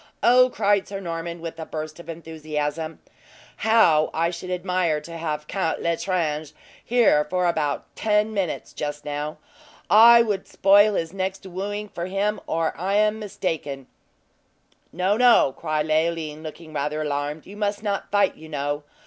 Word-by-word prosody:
Oh," 255 +1 +6
cried 205 -4 +1
Sir 195 -1 -5
Norman, 170 -2 -5
with 165 0 -7
a 160 - -5
burst 155 +1 -6
of 170 - -12
enthusiasm, 155 -1 -4 0.6
"how 180 -9 +4
I 165 +1 +1
should 180 +1 -7
admire 180 -3 0
to 165 +2 -10
have 155 -2 -3
Count 185 -1 -1
L'Estrange 165 -3 -1 0.3
here 230 -11 +4
for 180 +4 -1
about 155 -4 0
ten 215 0 +1
minutes, 195 -5 -3
just 145 0 -5
now! 150 +1 -4 0.5
I 235 +2 +9
would 205 -4 -2
spoil 205 +2 +5
his 165 0 -2
next 190 0 -3
wooing 205 +3 -4
for 175 -3 -5
him, 200 +3 -1
or 165 0 0
I 190 +4 -1
am 215 +1 +2
mistaken!" 160 -9 -4 1.1
"No, 185 +4 +1
no!" 240 - +5
said 155 -2 0
Leoline, 155 -1 0
looking 155 0 -9
rather 150 +1 -2
alarmed; 145 +1 -3
"you 200 - -11
must 205 0 -2
not 200 -2 -2
fight, 205 0 +2
you 160 0 -13
know. 145 0 -2
170 Hz, 155 wpm, -24 LUFS, 155-200 Hz, 1.1 s, I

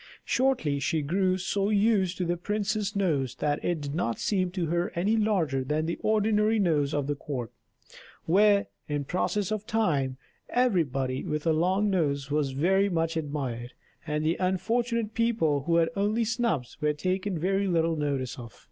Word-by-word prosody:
Shortly 245 - +1
she 155 +2 0
grew 185 +4 +1
so 195 +2 -1
used 205 -3 +2
to 180 - -1
the 175 +1 0
prince's 210 +2 -2
nose 150 -10 0
that 145 -1 -1
it 175 -3 -1
did 145 -1 -4
not 130 -9 -1
seem 185 -3 0
to 180 -1 -2
her 170 +2 -1
any 195 +6 +1
larger 185 -12 +1
than 155 +5 -1
ordinary 215 0 +2
noses 155 -7 +1
of 145 -2 0
the 145 - -1
court; 130 -5 -5 0.7
where, 200 +3 +4 0.2
in 145 -1 -1
process 185 +6 -1
of 215 0 -3
time, 145 -12 0 0.3
everybody 140 - +1
with 150 +1 -3
a 165 - +3
long 190 +6 +2
nose 140 -6 0
was 145 -2 0
very 190 +8 +2
much 165 -2 0
admired, 135 -6 -4 0.3
and 150 0 -1
the 165 +2 +1
unfortunate 220 +5 0
people 215 - +1
who 170 0 +2
had 165 -1 +3
only 210 +3 +1
snubs 220 - -2
were 150 0 +2
taken 185 +4 -2
very 195 +4 0
little 165 -2 +1
notice 140 -4 -2
of. 115 -2 -11
175 Hz, 165 wpm, -27 LUFS, 145-205 Hz, 0.7 s, where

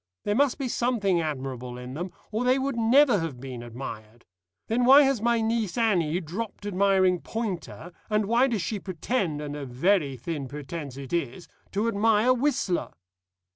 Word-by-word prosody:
There 205 - 0
must 275 +3 +2
be 275 -3 -2
something 225 -8 +1
admirable 130 -5 -4
in 125 +1 -8
them, 175 +5 -5 0.2
or 220 +3 -1
they 255 +1 +3
would 270 0 -1
never 235 0 +4
have 160 -7 -4
been 130 -2 -7
admired. 120 -2 -8 0.4
Then 235 +3 0
why 270 +4 +8
has 270 -5 +1
my 235 0 +2
niece 225 -2 -1
Annie 180 -8 +2
dropped 200 +5 -6
admiring 190 -2 +3
Poynter, 190 -6 -5 0.2
and 210 -1 +1
why 235 +5 +3
does 225 -7 -1
she 215 - -3
pretend 185 -3 -2
and 145 0 -5
a 145 - -5
very 140 +2 +1
thin 145 +1 -4
pretence 145 0 -7
it 140 +1 -8
is 170 0 -2 0.3
to 205 +3 0
admire 225 +2 +3
Whistler?" 240 - 0
190 Hz, 170 wpm, -26 LUFS, 145-230 Hz, 0.4 s, why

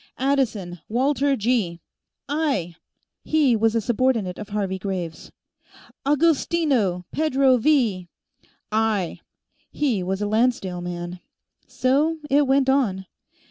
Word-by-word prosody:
"Addison, 230 -10 -1
Walter 275 +4 +1
G." 215 -7 0 0.5
"Aye!" 280 - -1 0.5
He 295 -6 +3
was 225 +1 +2
a 230 - +2
subordinate 225 -4 0
of 210 -1 -7
Harvey 195 -2 -2
Graves. 180 -4 -5 0.8
"Agostino, 285 - +2
Pedro 275 -4 +3
V." 225 -9 +1 0.6
"Aye!" 215 -5 0 0.5
He 260 -10 0
was 190 +2 -2
a 210 - -1
Lancedale 215 -5 0
man. 175 0 -6 0.5
So 290 +6 +1
it 285 0 +4
went 270 0 +3
on. 230 -9 +1
230 Hz, 105 wpm, -23 LUFS, 190-275 Hz, 0.8 s, it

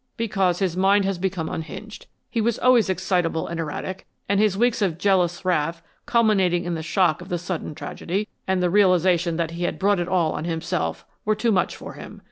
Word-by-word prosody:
"Because 195 -6 +1
his 185 -3 -1
mind 195 +2 +3
has 195 -2 -1
become 180 -3 -2
unhinged. 215 +7 -7 0.2
He 230 - -1
was 230 +1 +1
always 245 -5 +4
excitable 180 -3 0
and 170 0 -5
erratic, 165 +4 -5 0.2
and 200 0 +2
his 210 -2 +2
weeks 235 0 +2
of 180 -5 +1
jealous 185 -1 +1
wrath, 165 -1 0 0.2
culminating 195 -7 +3
in 175 - -2
the 160 - -3
shock 170 -1 +1
of - - -10
the 175 - 0
sudden 175 -3 -5
tragedy, 190 +6 -3 0.2
and 190 -1 +1
the 175 - +2
realization 180 -3 +3
that 165 -1 -1
he 170 +1 -7
had - - -2
brought 200 -1 +2
it 175 - -1
all 180 -3 +2
on 155 - -4
himself, 165 0 -2 0.2
were 215 +1 +1
too 230 +2 +1
much 185 -4 +1
for - - -9
him. - - -10
185 Hz, 205 wpm, -23 LUFS, 170-200 Hz, 0.2 s, always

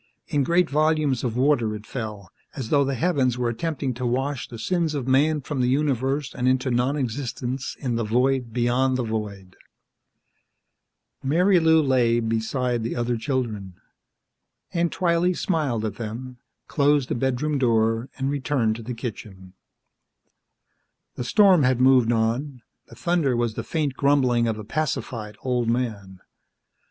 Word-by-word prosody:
In 145 -1 +1
great 170 +4 +2
volumes 155 -3 +1
of 120 -2 -2
water, 125 -5 +2
it 105 0 -9
fell, 105 -7 -6 0.2
as 130 -5 -5
though 145 -1 +4
the 135 0 -1
heavens 135 -6 +1
were 120 -1 0
attempting 135 +2 -2
to 125 +2 -6
wash 130 +2 -1
the 115 - -9
sins 165 +4 -1
of 135 -3 -3
man 145 +3 +3
from 140 -1 -3
the 125 - +2
universe 135 0 0
and 125 0 -1
into 130 0 +1
non 125 +4 +1
existence 125 0 -4
in 125 -4 -2
the 115 - -1
void 125 +2 +1
beyond 125 +2 +1
the 125 - -1
void. 105 -4 -5 1.7
Marilou 160 +1 +4
lay 120 -3 +3
beside 115 +2 -1
the 115 - -3
other 120 0 -1
children. 110 - -3 1.0
Aunt 170 -1 +1
Twylee 175 0 +1
smiled 145 - -1
at 105 -2 -4
them, 120 +3 -6 0.3
closed 145 -2 +2
the - - -2
bedroom 135 +4 -1
door 115 -1 +1
and 135 0 -1
returned 130 -6 0
to - - -8
the 120 +2 -6
kitchen. 100 -6 -8 1.6
The - - -5
storm 190 - +5
had 130 -2 +2
moved 130 -2 +5
on; 120 +3 -1 0.2
the - - -14
thunder 170 -8 +1
was 120 -2 0
the - - -5
faint 150 -4 -1
grumbling 130 -4 +2
of 110 -1 -1
a 110 - -7
pacified 115 -5 -3
old 125 -2 0
man. 105 -6 -3
125 Hz, 150 wpm, -24 LUFS, 115-145 Hz, 1.7 s, storm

